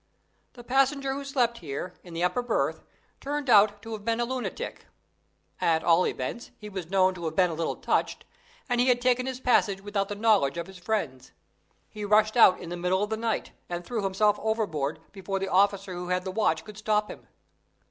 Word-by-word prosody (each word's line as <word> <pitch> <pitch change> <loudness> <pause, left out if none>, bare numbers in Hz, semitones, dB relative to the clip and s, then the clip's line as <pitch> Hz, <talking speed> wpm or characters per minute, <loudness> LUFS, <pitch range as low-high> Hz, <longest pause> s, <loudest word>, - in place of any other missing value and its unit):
The 240 - -12
passenger 270 +2 +1
who 280 +1 -5
slept 250 -4 0
here, 160 +3 -5
in 175 -2 -11
the 170 - -1
upper 215 +8 +1
berth, 240 -2 -1 0.4
turned 285 -2 -2
out 205 -1 +5
to 225 - -8
have 210 -2 -6
been 230 +1 0
a 240 - +1
lunatic 255 0 -5 0.7
at 160 -1 +2
all 170 +2 +4
events, 130 - -4
he 210 - -9
was 190 -4 -6
known 190 -1 +3
to 175 -2 -7
have 160 -1 -3
been 180 -2 +3
a - - -4
little 160 +1 -2
touched, - - -1 0.4
and 245 -1 +1
he 250 - +2
had 250 -1 +4
taken 250 +1 +1
his 260 -1 -4
passage 220 -6 +2
without 200 0 -2
the 205 - -3
knowledge 205 -9 +2
of 170 - -3
his 190 -1 -13
friends. 165 - -3 0.5
He 210 - -8
rushed 215 +2 +3
out 210 -6 +7
in 170 - -8
the 175 - -4
middle 180 +3 +1
of 210 - -3
the - - +1
night, 225 0 -2 0.2
and 175 0 -4
threw 235 -3 -2
himself 205 +2 +2
overboard, 200 -10 -2
before 195 0 -4
the 195 0 -3
officer 195 0 +2
who 175 0 -5
had 180 0 0
the 190 - -4
watch 175 -6 0
could 210 -1 -10
stop 210 -1 +1
him. - - -12
205 Hz, 210 wpm, -27 LUFS, 180-230 Hz, 0.7 s, out